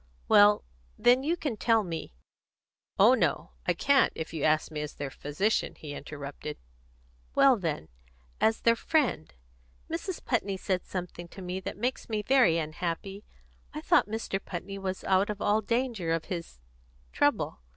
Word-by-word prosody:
"Well, 205 Hz, 0 st, +6 dB, 0.3 s
then, 245 Hz, +2 st, +5 dB
you 325 Hz, +5 st, 0 dB
can 285 Hz, -9 st, -3 dB
tell 225 Hz, 0 st, +3 dB
me 165 Hz, -, -6 dB, 0.4 s
" -, -, -57 dB
"Oh -, -, +8 dB
no, -, -, 0 dB, 0.2 s
I -, -, +2 dB
can't, 280 Hz, -1 st, +4 dB
if 160 Hz, -, -5 dB
you 155 Hz, -3 st, -3 dB
ask 155 Hz, +1 st, +2 dB
me 150 Hz, -1 st, -3 dB
as 150 Hz, -, -6 dB
their 140 Hz, -2 st, -5 dB
physician," 150 Hz, +12 st, -1 dB
he 150 Hz, -2 st, -8 dB
interrupted. 145 Hz, +1 st, -7 dB, 0.8 s
"Well, 270 Hz, -2 st, +6 dB
then, 165 Hz, -, -3 dB, 0.5 s
as 220 Hz, 0 st, +2 dB
their 230 Hz, 0 st, +4 dB
friend. 275 Hz, -, 0 dB, 0.6 s
Mrs. 340 Hz, +2 st, -4 dB
Putney 200 Hz, -6 st, 0 dB
said 185 Hz, 0 st, -2 dB
something 175 Hz, -1 st, -5 dB
to 190 Hz, -, -11 dB
me 180 Hz, +1 st, -3 dB
that 190 Hz, -, -6 dB
makes 245 Hz, +4 st, -2 dB
me 215 Hz, -1 st, -1 dB
very 245 Hz, -10 st, +4 dB
unhappy. 170 Hz, +5 st, -4 dB, 0.5 s
I -, -, -4 dB
thought -, -, +3 dB
Mr. 210 Hz, -3 st, -3 dB
Putney 195 Hz, +2 st, -6 dB
was 190 Hz, -1 st, -4 dB
out 190 Hz, +1 st, +2 dB
of 210 Hz, -1 st, -3 dB
all 210 Hz, +2 st, +2 dB
danger 230 Hz, -7 st, -1 dB
of 165 Hz, -1 st, -2 dB
his 170 Hz, -, -6 dB, 0.5 s
trouble. -, -, +1 dB
195 Hz, 160 wpm, -29 LUFS, 165-230 Hz, 0.8 s, Oh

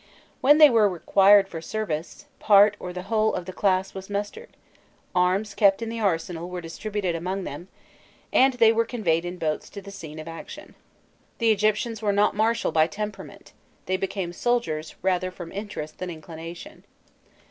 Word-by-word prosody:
When 290 Hz, +3 st, +6 dB
they 310 Hz, -1 st, +9 dB
were 220 Hz, -3 st, +4 dB
required 195 Hz, +3 st, +4 dB
for 165 Hz, -4 st, -7 dB
service, 170 Hz, -4 st, -4 dB
part 205 Hz, 0 st, +6 dB
or 180 Hz, -, -6 dB
the 180 Hz, 0 st, -6 dB
whole 220 Hz, +2 st, +1 dB
of 180 Hz, -, -4 dB
the 185 Hz, -, -7 dB
class 190 Hz, -1 st, +1 dB
was 190 Hz, 0 st, -8 dB
mustered; 205 Hz, -, -5 dB, 0.6 s
arms 185 Hz, +4 st, +1 dB
kept 200 Hz, -2 st, +4 dB
in 225 Hz, -, -4 dB
the 230 Hz, 0 st, -5 dB
arsenal 175 Hz, -3 st, -1 dB
were 180 Hz, 0 st, -5 dB
distributed 185 Hz, +2 st, -3 dB
among 185 Hz, +4 st, -3 dB
them, 170 Hz, +3 st, -7 dB, 0.7 s
and 265 Hz, +1 st, +5 dB
they 230 Hz, -2 st, +5 dB
were 230 Hz, +1 st, +2 dB
conveyed 175 Hz, -9 st, -1 dB
in 175 Hz, +1 st, -5 dB
boats 155 Hz, -3 st, -3 dB
to 200 Hz, -, -8 dB
the 200 Hz, 0 st, -11 dB
scene 160 Hz, -6 st, -9 dB
of 155 Hz, -, -8 dB
action. 165 Hz, 0 st, -9 dB, 0.6 s
The 230 Hz, -2 st, +3 dB
Egyptians 215 Hz, +2 st, 0 dB
were 210 Hz, -2 st, +1 dB
not 205 Hz, +1 st, +2 dB
martial 225 Hz, +2 st, +1 dB
by 155 Hz, 0 st, +3 dB
temperament; 210 Hz, +4 st, -7 dB, 0.3 s
they 185 Hz, -, 0 dB
became 190 Hz, -2 st, -3 dB
soldiers 175 Hz, -9 st, -1 dB
rather 185 Hz, -1 st, +1 dB
from 175 Hz, -2 st, -9 dB
interest 200 Hz, -7 st, -7 dB
than 185 Hz, -, -4 dB
inclination. 165 Hz, -, -9 dB
195 Hz, 170 wpm, -25 LUFS, 175-215 Hz, 0.7 s, they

